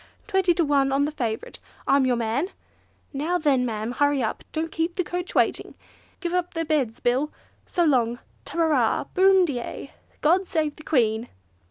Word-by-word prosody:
Twenty 380 -3 +2
to 335 - +2
one 280 -2 +2
on 275 +1 +2
the 300 - -2
favourite! 230 -7 -4 0.3
I'm 275 -1 +4
your 250 - +2
man! 235 - -1 0.6
Now 310 +6 0
then, 285 -6 +2
ma'am; 220 0 -3
hurry 285 0 +2
up, 220 - -3
don't 325 +1 -3
keep 330 +1 -1
the 365 - 0
coach 355 +1 -5
awaiting! - - +1 0.5
Give 345 -1 -2
'um 360 -1 +1
their 330 0 -1
'eds, 260 -7 0
Bill! 260 +5 +1 0.4
So 345 - +1
long! 245 -5 +2 0.3
Ta 290 - -8
ra 335 - +4
ra, 260 -8 +2
boom 380 0 +5
di 265 -7 -2
ay! 275 - -7 0.3
God 355 +5 +3
save 310 -2 -1
the 310 - -12
Queen!" 230 -6 +1
290 Hz, 185 wpm, -25 LUFS, 250-340 Hz, 0.6 s, boom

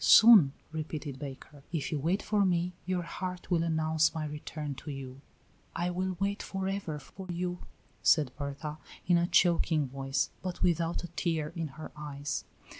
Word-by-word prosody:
"Soon," 210 -12 +9 0.2
repeated 155 -3 -4
Baker. 140 0 -8
"If 160 -5 -2
you 150 - 0
wait 175 +8 +1
for 210 -1 +2
me 180 -1 +1
your 180 -1 0
heart 180 +1 -5
will 170 -2 +4
announce 160 -1 +2
my 155 -1 -2
return 150 0 -5
to - - -8
you." 135 -1 -7 0.5
"I 175 +1 0
will 185 0 -2
wait 200 +1 0
for 190 -1 -3
ever 195 -6 -2
for 185 +7 -10
you," 180 +1 -2 0.4
said 150 -6 +4
Berta, 145 +2 -5 0.3
in 175 0 +5
a 170 - +2
choking 165 -5 +3
voice, 135 +1 -1
but 185 -1 -3
without 170 -1 +1
a - - -4
tear 165 -3 -1
in 165 -2 -2
her 155 - -7
eyes. 145 -1 -4
160 Hz, 170 wpm, -31 LUFS, 150-180 Hz, 0.5 s, Soon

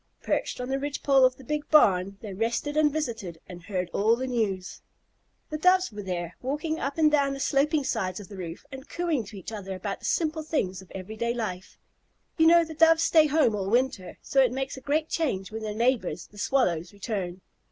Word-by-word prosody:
Perched - - -1
on 250 - -3
the 270 +1 0
ridge 285 0 -4
pole 275 -2 +5
of 255 0 +2
the 265 - -14
big 300 +3 -3
barn, 195 -9 +4
they 210 -3 -7
rested 230 +8 -1
and 305 -1 +4
visited 225 - -4
and 180 -1 -10
heard 180 0 -3
all 220 +3 +3
the 255 +2 -3
news. 210 -7 -2 0.7
The 305 - -3
Doves 365 0 +4
were 210 -1 -7
there, 175 -3 -4
walking 300 +5 -2
up 280 +2 -3
and 310 -2 +4
down 280 -2 +2
the - - -7
sloping 290 +2 +2
sides 190 -8 -2
of 205 - -10
the 205 - -10
roof 175 +4 -7
and 265 +1 -10
cooing 330 -9 -1
to 205 +1 -10
each 190 +2 -8
other 195 -3 -5
about 195 +2 -4
the - - -10
simple 315 -1 0
things 200 - -2
of 190 - -17
every 195 +3 -7
day 235 +1 -1
life. 190 -6 -5 0.6
You 320 -1 +4
know 340 0 +7
the 320 -1 -7
Doves 325 +1 +5
stay 315 -2 +5
at - - -1
home 295 -6 +3
all 195 -1 -2
winter, 235 -5 +1
and - - -11
so 270 - +3
it 255 -3 +3
makes 265 +1 -3
a 265 - -10
great 305 +4 0
change 210 - -2
when 220 +1 -5
their 215 -1 -4
neighbors, 225 -8 0
the 205 - -15
Swallows, 180 -10 +1
return. 195 -4 -4
240 Hz, 225 wpm, -27 LUFS, 195-295 Hz, 0.7 s, know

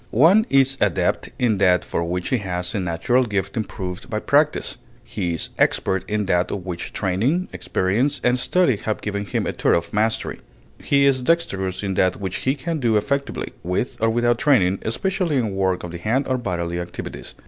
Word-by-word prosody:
One 190 - +6
is 135 0 +4
adept 100 -4 +1
in 110 -5 +1
that 90 -2 +4
for 85 - -2
which 90 +1 -2
he 130 - +1
has 90 -1 -3
a 105 - -1
natural 90 +8 +1
gift 100 -2 -2
improved 95 -4 -5
by - - -2
practise; - - +1 0.3
he 85 -2 -3
is - - -4
expert 95 -1 +1
in 105 -1 0
that 90 -1 +1
of 95 -3 -4
which 90 -2 -5
training, 115 - 0
experience, 120 +10 0
and 125 +1 +2
study 170 - +2
have 110 +1 -3
given 100 -1 -3
him - - -1
a - - -1
thorough 85 - +2
mastery; 110 +1 -1 0.4
he 140 0 +3
is 135 -2 +3
dexterous 100 - 0
in 95 -1 -1
that 95 0 +2
which 95 -2 -3
he 130 +2 0
can 155 +3 -3
do 115 -5 +2
effectively, 140 +6 -2
with 90 +8 -2
or 115 - +3
without 120 +1 +2
training, 100 -10 +3
especially 180 - -1
in 115 -6 0
work 95 -1 0
of 85 - -6
the 85 - -7
hand 115 +9 0
or 130 -1 0
bodily 85 -6 -3
activities. 85 0 -7
105 Hz, 190 wpm, -22 LUFS, 90-130 Hz, 0.4 s, One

